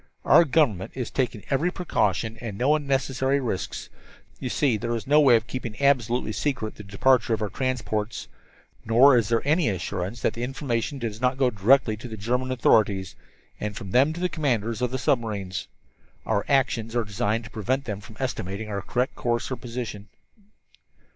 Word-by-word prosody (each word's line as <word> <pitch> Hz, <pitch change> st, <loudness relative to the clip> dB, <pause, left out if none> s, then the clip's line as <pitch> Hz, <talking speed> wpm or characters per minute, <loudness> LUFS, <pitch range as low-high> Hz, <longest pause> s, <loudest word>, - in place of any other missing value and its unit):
"Our 170 Hz, -, +7 dB
government 130 Hz, -, +1 dB
is 125 Hz, -3 st, -4 dB
taking 120 Hz, -6 st, -1 dB
every 145 Hz, +6 st, +2 dB
precaution, 110 Hz, -, -1 dB
and 110 Hz, -5 st, -5 dB
no 130 Hz, +6 st, +3 dB
unnecessary 135 Hz, -1 st, 0 dB
risks. 115 Hz, -9 st, -4 dB, 0.5 s
You 125 Hz, -, -3 dB
see, 135 Hz, -2 st, +2 dB
there 115 Hz, +3 st, -2 dB
is 115 Hz, -, -5 dB
no 150 Hz, +2 st, +5 dB
way 130 Hz, -5 st, +6 dB
of 110 Hz, -1 st, +1 dB
keeping 120 Hz, -3 st, -6 dB
absolutely 125 Hz, -5 st, +2 dB
secret 110 Hz, -2 st, -2 dB
the 105 Hz, -, -11 dB
departure 115 Hz, +4 st, +2 dB
of 110 Hz, -, -9 dB
our 105 Hz, -, -3 dB
transports. 120 Hz, -4 st, -2 dB, 0.6 s
Nor 125 Hz, +5 st, +6 dB
is 115 Hz, -4 st, +2 dB
there 115 Hz, -1 st, +1 dB
any 155 Hz, 0 st, +3 dB
assurance 95 Hz, +3 st, -4 dB
that -, -, +2 dB
the 115 Hz, -, -6 dB
information 130 Hz, 0 st, -2 dB
does 115 Hz, -3 st, -5 dB
not 125 Hz, +1 st, +1 dB
go 130 Hz, -2 st, +2 dB
directly 110 Hz, +2 st, +3 dB
to 125 Hz, -, -8 dB
the 110 Hz, -2 st, -7 dB
German 125 Hz, +5 st, -1 dB
authorities, 105 Hz, -6 st, +2 dB, 0.5 s
and 105 Hz, -1 st, -4 dB
from 95 Hz, -, -7 dB
them 135 Hz, +7 st, +4 dB
to 170 Hz, -, -7 dB
the 180 Hz, -, +1 dB
commanders 120 Hz, -9 st, -1 dB
of 125 Hz, -, +1 dB
the 130 Hz, -, -2 dB
submarines. 105 Hz, -8 st, -1 dB, 0.6 s
Our 100 Hz, -2 st, 0 dB
actions 120 Hz, -5 st, +1 dB
are 120 Hz, -, +2 dB
designed 110 Hz, +2 st, -1 dB
to 115 Hz, -, -11 dB
prevent 130 Hz, +6 st, -1 dB
them 105 Hz, -3 st, -4 dB
from 105 Hz, 0 st, -14 dB
estimating 105 Hz, -5 st, -3 dB
our 100 Hz, -1 st, -3 dB
course 120 Hz, +2 st, -1 dB
or -, -, 0 dB
position. 115 Hz, -4 st, -6 dB
120 Hz, 180 wpm, -25 LUFS, 105-130 Hz, 0.6 s, Our